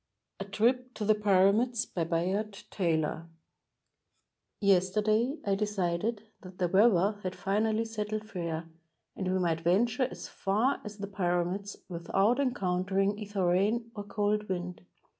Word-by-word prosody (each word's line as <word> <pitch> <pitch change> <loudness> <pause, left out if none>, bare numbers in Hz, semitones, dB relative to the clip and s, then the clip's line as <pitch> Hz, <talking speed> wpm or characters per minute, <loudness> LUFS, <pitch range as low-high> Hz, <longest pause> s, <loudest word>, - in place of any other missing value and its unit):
A 195 - -4
TRIP 245 +5 0
TO 215 - -3
THE 215 - +5
PYRAMIDS 210 +3 +3
BY 170 -3 -2
BAYARD 190 +5 -1
TAYLOR 165 -3 0 1.3
Yesterday 210 - +2
I 200 - +2
decided 205 +1 -1 0.2
that 185 -1 -12
the 180 - +1
weather 200 +1 +4
had 185 -1 -4
finally 215 +4 0
set 215 -2 -4
tled 215 0 -2
fair, 170 -5 -4 0.5
and 185 -1 -2
we 185 - +1
might 165 -3 0
venture 220 +9 +2
as - - -8
far 215 +8 0
as 210 -1 -8
the 200 - -4
Pyramids 190 0 -1
without 195 +7 +1
encountering 195 -4 0
either 205 -3 -2
rain 210 +6 +1
or 205 - -6
cold 210 0 -1
wind. 180 -1 -4
200 Hz, 140 wpm, -30 LUFS, 180-215 Hz, 1.3 s, THE